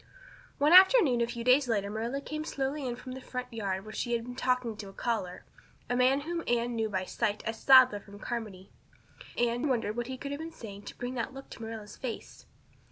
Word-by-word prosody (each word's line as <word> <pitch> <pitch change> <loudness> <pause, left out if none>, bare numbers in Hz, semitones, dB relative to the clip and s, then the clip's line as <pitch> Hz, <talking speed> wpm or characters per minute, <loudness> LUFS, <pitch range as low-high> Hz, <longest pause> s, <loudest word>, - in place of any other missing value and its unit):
One 295 +4 +4
afternoon 370 - +7
a 235 - +2
few 235 0 -5
days 255 +2 +5
later 205 -3 0
Marilla 230 +6 -3
came 305 +2 -5
slowly 275 -2 -2
in 240 - -2
from 250 +1 -9
the 260 +1 -7
front 250 -1 -6
yard 195 -3 -3
where 215 - -9
she 240 +1 -2
had 230 -1 0
been 245 +1 -8
talking 250 -3 0
to 200 -2 -7
a - - -13
caller 190 -6 -3 0.5
a - - +2
man 255 +3 +3
whom 335 +2 -3
Anne 240 0 +1
knew 220 -1 0
by 190 -2 -2
sight 205 +2 -1
as 225 0 -3
Sadler 260 -5 +7
from 200 0 -13
Carmody. 210 -4 -6 0.7
Anne 240 +3 +1
wondered 230 -5 0
what 240 0 -3
he 260 0 -5
could 280 +2 -6
have 285 - -4
been 325 +1 -6
saying 205 -7 -10
to - - -9
bring 245 +1 -4
that 255 +2 -3
look 270 - -10
to - - -10
Marilla's 220 -2 -7
face. 250 -3 -7
240 Hz, 225 wpm, -30 LUFS, 220-265 Hz, 0.7 s, afternoon